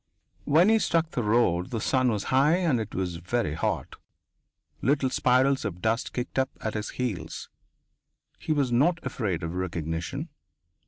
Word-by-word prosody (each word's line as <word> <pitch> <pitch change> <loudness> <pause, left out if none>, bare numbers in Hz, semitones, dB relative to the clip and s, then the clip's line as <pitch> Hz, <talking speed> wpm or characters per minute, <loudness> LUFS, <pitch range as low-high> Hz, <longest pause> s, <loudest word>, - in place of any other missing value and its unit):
When 160 +7 +5
he 225 0 +5
struck 165 -4 +1
the 125 - -1
road 105 -6 +2
the 115 - -3
sun 130 +3 +2
was 105 -4 -1
high 140 +5 +5
and 170 -9 +1
it 110 -1 -5
was 90 -2 -2
very 95 0 -1
hot. 80 - -2 0.8
Little 135 -1 +1
spirals 130 +2 +3
of 90 -2 -4
dust 115 +4 0
kicked 125 +1 -3
up 130 0 +1
at 110 -3 -3
his 105 0 -3
heels. 100 -11 -4 0.9
He - - -4
was 140 -5 +1
not 150 +9 +3
afraid 95 -8 -2
of 80 +1 -3
recognition. 85 -3 -3
120 Hz, 160 wpm, -27 LUFS, 90-135 Hz, 0.9 s, When